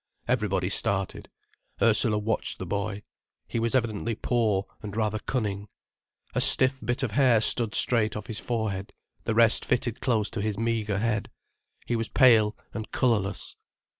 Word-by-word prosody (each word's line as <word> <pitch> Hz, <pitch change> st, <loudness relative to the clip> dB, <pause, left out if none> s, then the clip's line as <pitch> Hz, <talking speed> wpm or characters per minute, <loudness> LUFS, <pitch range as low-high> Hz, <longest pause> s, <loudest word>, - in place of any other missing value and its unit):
Everybody 105 Hz, -7 st, 0 dB
started. 100 Hz, -1 st, -1 dB, 0.5 s
Ursula 110 Hz, -1 st, +4 dB
watched 110 Hz, +1 st, -1 dB
the -, -, -6 dB
boy. 100 Hz, 0 st, -3 dB, 0.4 s
He 115 Hz, -, -2 dB
was 115 Hz, +2 st, 0 dB
evidently 115 Hz, -2 st, -1 dB
poor, 110 Hz, -4 st, 0 dB, 0.2 s
and 105 Hz, 0 st, -7 dB
rather 110 Hz, -1 st, 0 dB
cunning. 105 Hz, -5 st, -3 dB, 0.7 s
A -, -, 0 dB
stiff 130 Hz, +1 st, +3 dB
bit 120 Hz, +5 st, -1 dB
of 125 Hz, -, -1 dB
hair 125 Hz, -2 st, +4 dB
stood 110 Hz, 0 st, +1 dB
straight 110 Hz, -3 st, +2 dB
off 105 Hz, -, -5 dB
his 110 Hz, -2 st, -5 dB
forehead, 105 Hz, -5 st, -3 dB, 0.3 s
the 115 Hz, -, -1 dB
rest 115 Hz, -1 st, +4 dB
fitted 125 Hz, -2 st, -1 dB
close 110 Hz, -4 st, +1 dB
to 115 Hz, -, -3 dB
his 105 Hz, -1 st, -2 dB
meagre 110 Hz, -3 st, -1 dB
head. 105 Hz, -2 st, -1 dB, 0.6 s
He 120 Hz, -, -1 dB
was 115 Hz, -1 st, -1 dB
pale 110 Hz, -6 st, +5 dB, 0.2 s
and 110 Hz, -1 st, -6 dB
colourless. 105 Hz, -6 st, 0 dB
110 Hz, 155 wpm, -27 LUFS, 105-115 Hz, 0.7 s, pale